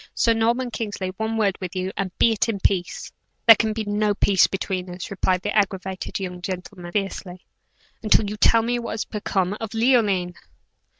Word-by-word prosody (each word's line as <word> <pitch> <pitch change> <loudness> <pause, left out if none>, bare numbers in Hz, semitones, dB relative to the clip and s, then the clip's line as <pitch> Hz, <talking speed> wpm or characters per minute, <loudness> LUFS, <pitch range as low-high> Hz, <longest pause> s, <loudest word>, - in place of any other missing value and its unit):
Sir 230 - +3
Norman 235 +3 0
Kingsley, 205 -5 -4
one 220 +1 -2
word 200 -3 +2
with 185 0 -5
you, 185 +1 -2
and 195 -1 -2
be 230 - +4
it 225 +1 0
in 205 -3 -2
peace." 185 -2 -1 0.3
"There 225 - +10
can 220 +1 0
be 220 0 -3
no 205 0 0
peace 195 -2 +4
between 185 -1 -3
us," 180 +2 -7
replied 185 -1 0
that 205 - -2
aggravated 190 -2 -1
young 180 -2 -5
gentleman, 180 -1 -6
fiercely 190 -2 -4 0.6
"until 215 -1 +3
you 210 - -4
tell 225 +1 +4
me 240 +1 0
what 235 - -5
has 220 - -3
become 195 -2 -1
of 225 0 -5
Leoline." 215 -7 +2
205 Hz, 185 wpm, -23 LUFS, 185-225 Hz, 0.6 s, There